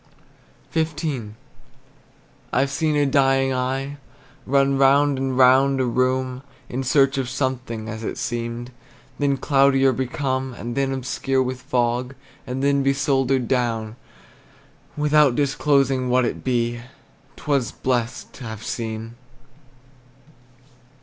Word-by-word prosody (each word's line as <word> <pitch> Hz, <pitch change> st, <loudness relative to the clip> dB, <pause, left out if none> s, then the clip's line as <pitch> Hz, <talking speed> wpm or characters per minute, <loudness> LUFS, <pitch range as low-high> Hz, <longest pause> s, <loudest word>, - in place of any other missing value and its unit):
XV. 150 Hz, -9 st, -2 dB, 1.2 s
I've 135 Hz, +2 st, +1 dB
seen 155 Hz, +1 st, 0 dB
a 145 Hz, -1 st, +3 dB
dying 135 Hz, -1 st, +2 dB
eye 135 Hz, +2 st, -2 dB, 0.5 s
Run 135 Hz, +1 st, +3 dB
round 140 Hz, 0 st, +4 dB
and 130 Hz, -1 st, -2 dB
round 135 Hz, +1 st, +5 dB
a 130 Hz, -, +2 dB
room 130 Hz, +1 st, 0 dB, 0.3 s
In 130 Hz, -, -3 dB
search 135 Hz, +1 st, +3 dB
of 130 Hz, -2 st, -2 dB
something, 130 Hz, -4 st, -3 dB
as 110 Hz, 0 st, -6 dB
it -, -, -4 dB
seemed, 120 Hz, +1 st, -4 dB, 0.5 s
Then 140 Hz, -1 st, +1 dB
cloudier 135 Hz, -1 st, +3 dB
become; 130 Hz, 0 st, -2 dB
And 120 Hz, 0 st, -6 dB
then, 135 Hz, -1 st, 0 dB
obscure 130 Hz, 0 st, -1 dB
with 130 Hz, 0 st, -4 dB
fog, 125 Hz, +1 st, -1 dB, 0.3 s
And 130 Hz, +2 st, -3 dB
then 140 Hz, 0 st, +3 dB
be 135 Hz, 0 st, +2 dB
soldered 135 Hz, -3 st, +1 dB
down, 115 Hz, -3 st, -1 dB, 1.0 s
Without 150 Hz, -3 st, +4 dB
disclosing 135 Hz, -2 st, +1 dB
what 125 Hz, 0 st, +3 dB
it -, -, -4 dB
be, 120 Hz, -2 st, -1 dB, 0.5 s
'T -, -, -15 dB
were 145 Hz, -3 st, +2 dB, 0.2 s
blessed 120 Hz, -2 st, -1 dB
to 130 Hz, -, -11 dB
have 110 Hz, -1 st, -7 dB
seen. 115 Hz, 0 st, -4 dB
130 Hz, 125 wpm, -22 LUFS, 125-140 Hz, 1.2 s, round